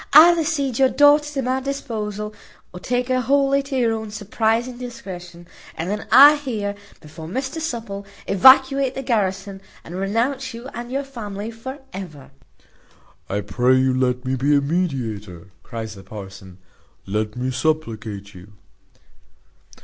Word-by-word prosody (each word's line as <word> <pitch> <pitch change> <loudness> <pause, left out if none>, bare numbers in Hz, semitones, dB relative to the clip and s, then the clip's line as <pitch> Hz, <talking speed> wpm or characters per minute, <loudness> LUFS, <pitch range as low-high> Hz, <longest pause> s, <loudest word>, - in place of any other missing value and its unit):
Either 330 +2 +8
cede 280 -6 -1
your 265 -1 +5
daughter 290 +2 +5
to 275 -2 -2
my 255 +1 0
disposal, 215 -6 -4 0.4
or 180 - -8
take 245 +5 -1
her 255 0 +2
wholly 275 +2 +2
to 275 -1 -4
your 235 -3 +2
own 220 -1 -4
surprizing 225 +4 -1
discretion, 180 -8 -9 0.3
and 170 +4 -3
then 210 +1 -4
I 290 +3 +9
here, 220 -8 -3 0.3
before 160 +1 -10
Mr 265 - -4
Supple, 225 -9 -5 0.2
evacuate 265 +5 +5
the 270 - -4
garrison, 195 -5 -1 0.2
and 170 - -10
renounce 230 +6 -1
you 235 +3 -8
and 240 +1 -7
your 275 +2 -1
family 220 -5 -6
for 260 +5 -8 0.2
ever." 155 -9 -9 1.0
"I 100 +1 -1
pray 125 +5 +2
you 130 0 +3
let 125 0 0
me 130 +1 0
be 140 +3 +2
a - - +5
mediator," 115 - -3
cries 110 -2 -6
the 100 - -12
parson, 95 -2 -10 0.5
"let 105 +2 -2
me 125 +1 -2
supplicate 115 -8 -2
you." 95 +2 -14
210 Hz, 150 wpm, -22 LUFS, -, 1.0 s, I